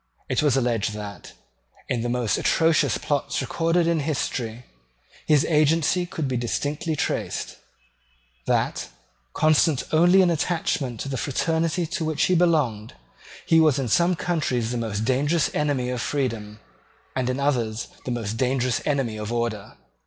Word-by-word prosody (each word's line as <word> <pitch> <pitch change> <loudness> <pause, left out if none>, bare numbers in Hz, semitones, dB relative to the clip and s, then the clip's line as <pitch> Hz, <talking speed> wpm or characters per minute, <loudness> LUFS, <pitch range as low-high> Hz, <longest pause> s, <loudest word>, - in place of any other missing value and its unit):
It - - +1
was 145 -3 +3
alleged 115 -4 0
that, 105 -1 -8 0.5
in 120 - -1
the 120 - -2
most 120 -3 0
atrocious 155 -7 +2
plots 145 -2 -1
recorded 165 +1 +1
in 165 -1 +1
history, 125 -5 -3 0.6
his 150 -2 +4
agency 160 +3 +2
could 160 -4 -3
be 130 -1 -1
distinctly 145 +6 -2
traced; - - -3 0.9
that, - - 0 0.5
constant 155 -2 +3
only 175 +4 +5
in 175 - +3
attachment 155 -7 -1
to - - -4
the 135 -1 -3
fraternity 160 +5 0
to 160 - -3
which 155 -1 0
he 185 - +3
belonged, 150 - +1 0.5
he 165 - +5
was 155 -4 +4
in 135 -2 -1
some 175 +9 +3
countries 140 -9 -1
the 125 - -2
most 110 -2 -2
dangerous 145 +6 +1
enemy 140 -4 0
of 125 -2 -3
freedom, 115 -7 -3 0.6
and 130 -1 0
in 130 +1 -1
others 120 -6 -1 0.2
the - - -5
most 115 -3 -3
dangerous 125 0 0
enemy 135 -7 0
of 105 +1 -5
order. 115 -4 -3
135 Hz, 150 wpm, -24 LUFS, 120-160 Hz, 0.9 s, only